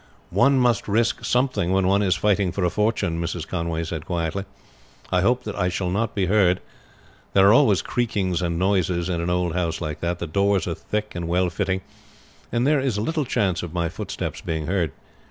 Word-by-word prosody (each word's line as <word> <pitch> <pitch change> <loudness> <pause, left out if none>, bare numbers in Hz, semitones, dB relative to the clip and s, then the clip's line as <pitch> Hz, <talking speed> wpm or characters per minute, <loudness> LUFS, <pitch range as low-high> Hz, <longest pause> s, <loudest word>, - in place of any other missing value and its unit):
"One 140 0 +4
must 120 -4 +2
risk 115 +3 +1
something 125 -8 +1
when 95 -1 +2
one 100 +2 +3
is 95 -3 +2
fighting 100 -3 +1
for 90 +1 -2
a 90 - +2
fortune," 105 -6 0
Mrs. 85 -1 -3
Conway 85 -2 -2
said 80 -1 -5
quietly. 85 +2 -2 0.7
"I 90 - +3
hope 125 +6 +2
that 105 -1 -5
I 90 -2 +1
shall 90 0 -2
not 110 +4 -1
be 100 -2 +1
heard. 95 -2 +3 0.7
There 95 0 +6
are 105 - +7
always 115 -7 +4
creakings 100 -7 -1
and 85 -1 -1
noises 90 -2 +1
in 85 -2 -1
an 85 - -2
old 90 -1 0
house 85 -2 -1
like 75 -2 -4
that. 85 +1 -1
The 85 - -4
doors 100 +2 +1
are 85 - -1
thick 105 +5 -4
and 85 -1 -4
well 90 +1 +1
fitting, 95 +1 -1 0.7
and 120 +1 +1
there 150 0 +3
is 130 -6 -1
little 150 +8 -1
chance 95 -8 0
of 90 -1 -7
my 85 -1 0
footsteps - - -5
being 80 -2 -3
heard. 85 -3 0
95 Hz, 205 wpm, -23 LUFS, 85-105 Hz, 0.7 s, are